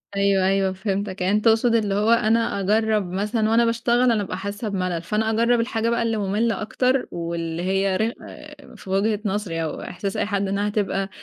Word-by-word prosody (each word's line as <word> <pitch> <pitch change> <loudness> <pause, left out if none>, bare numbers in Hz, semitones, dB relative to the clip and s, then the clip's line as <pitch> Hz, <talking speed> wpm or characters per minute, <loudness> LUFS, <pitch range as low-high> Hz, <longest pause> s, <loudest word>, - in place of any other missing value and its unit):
أيوه، 200 -1 +2
أيوه 195 -1 +1
فهمتك، 195 0 -3
يعني 190 +3 +1
أنت 215 - -4
تقصد 225 +1 +4
اللي 205 -3 +1
هو 210 +3 +2
أنا 230 -2 +2
أجرب 210 -1 +1
مثلًا 215 +3 0
وأنا 235 +1 +4
باشتغل 235 +1 +1
أنا - - +2
بابقى 195 -3 -3
حاسة 205 +3 -4
بملل، 185 -3 -2
فأنا 215 +6 -1
أجرب 235 +2 +2
الحاجة 230 -1 -1
بقى 235 0 +1
اللي 225 -1 0
مملة 210 +2 0
أكتر، 255 +4 0
واللي 170 0 -4
هي 195 +1 +1
رخ 225 +2 0 0.6
في - - -12
وجهة 205 +2 +1
نظري 190 -5 -2
أو 155 - -4
إحساس 195 +2 -5
أي - - 0
حد 200 -1 -1
إنها 200 +1 -1
هتبقى 200 -2 -1
205 Hz, 190 wpm, -23 LUFS, 190-225 Hz, 0.6 s, تقصد